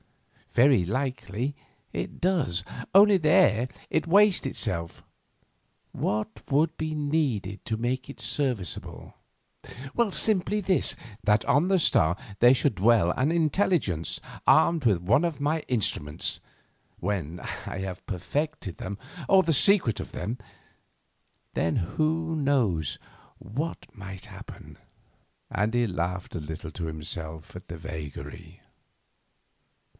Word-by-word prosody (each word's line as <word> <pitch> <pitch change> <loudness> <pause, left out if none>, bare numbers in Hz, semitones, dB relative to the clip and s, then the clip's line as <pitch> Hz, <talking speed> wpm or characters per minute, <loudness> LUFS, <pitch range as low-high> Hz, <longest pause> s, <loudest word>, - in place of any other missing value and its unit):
Very 125 -6 +5
likely 130 +3 -3 0.4
it - - -5
does, 155 - +1 0.3
only 200 +1 +7
there 130 - +3 0.2
it 160 - 0
wastes 200 0 +5
itself. 90 -10 -1 0.9
What 110 +1 -2
would 150 +4 +2
be 155 0 -3
needed 145 -10 -1
to 110 - -2
make 125 +3 -2
it - - -10
serviceable? 115 - -3 1.0
Simply 210 +1 +1
this—that 115 - +1
on 145 +7 +3
the 190 -1 +4
star 85 - +3 0.2
there 120 +2 +7
should 130 -3 +1
dwell 100 -2 +4
an 135 - 0
Intelligence 160 - +1 0.3
armed 165 -3 +4
with 105 -8 +3
one 100 - +2
of 170 -4 -2
my 150 +3 +1
instruments, 85 - -1 0.6
when 90 -4 -3 0.3
I - - -5
have 95 -1 -6
perfected 100 - -3
them, 100 +1 -6 0.3
or 190 -1 +6
the 165 - +1
secret 175 - +6
of - - -9
them. 115 +4 -4 1.2
Then 80 - 0
who 160 - -1
knows 125 - +1 0.4
what 140 - -5
might 95 -4 -9
happen?" - - -12 0.7
and 105 +4 -1
he 120 -1 +2
laughed 90 0 -3
a - - -2
little 80 +1 -7
to 85 +2 -5
himself 80 +1 -5
at 90 - -10
the 85 - -7
vagary. 80 -2 -8
115 Hz, 120 wpm, -27 LUFS, -, 1.2 s, only